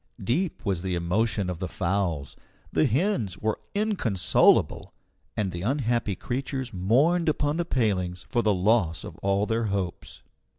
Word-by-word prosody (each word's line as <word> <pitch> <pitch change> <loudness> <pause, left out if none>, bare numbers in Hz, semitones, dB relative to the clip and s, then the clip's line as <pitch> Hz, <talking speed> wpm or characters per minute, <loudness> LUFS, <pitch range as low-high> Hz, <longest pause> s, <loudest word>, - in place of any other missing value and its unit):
Deep 155 - -1
was 95 -4 0
the 95 -1 -2
emotion 95 +4 0
of 90 -2 -4
the 95 - -2
fowls. 85 -6 -2 0.4
The 155 - +3
hens 125 - 0
were 110 0 -1 0.2
inconsolable, 190 - +2 0.4
and 100 -3 0
the 85 -1 -5
unhappy 120 -3 0
creatures 130 - -4
mourned 140 - +3
upon 150 0 0
the 175 - 0
palings 95 - -1
for 120 - +1
the 110 - +2
loss 95 -3 +2
of - - -8
all 100 +1 +1
their 115 +1 0
hopes. 100 -4 -4
105 Hz, 145 wpm, -26 LUFS, 90-130 Hz, 0.4 s, The